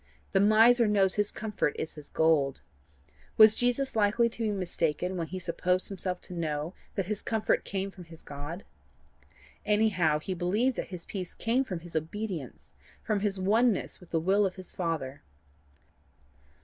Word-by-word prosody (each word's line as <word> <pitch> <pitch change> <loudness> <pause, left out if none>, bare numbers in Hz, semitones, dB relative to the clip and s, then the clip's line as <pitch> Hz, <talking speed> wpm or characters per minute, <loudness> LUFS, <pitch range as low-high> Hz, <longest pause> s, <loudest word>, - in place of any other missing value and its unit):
The - - +3
miser 225 +3 +6
knows 195 -3 +3
his 205 -1 0
comfort 210 -8 -2
is 160 - -4
his 150 -2 -11
gold. 155 -4 +2 0.8
Was 215 -1 +9
Jesus 245 +3 0
likely 220 +2 +3
to 230 - -9
be 220 - +1
mistaken 180 -2 -1
when 170 -2 -3
he 185 - -5
supposed 180 +1 0
himself 185 -2 -3
to - - -10
know 160 -1 -3 0.2
that 195 - -1
his 210 +2 -3
comfort 220 -2 0
came 195 0 -3
from 180 -2 -12
his 165 -1 -14
God? 145 +6 -7 1.0
Anyhow 205 -7 +2
he 170 +5 -4
believed 210 +9 0
that - - -3
his 180 -3 -8
peace 185 -3 -6
came 240 +4 +1
from 185 -10 -5
his 170 -1 -11
obedience 165 - -4 0.3
from 215 -2 0
his 200 -1 -1
oneness 215 +3 +2
with 180 - -16
the 165 - +1
will 195 +5 +3
of 190 -2 -1
his 185 -1 -5
Father. 155 -6 -3
190 Hz, 165 wpm, -29 LUFS, 170-215 Hz, 1.0 s, Was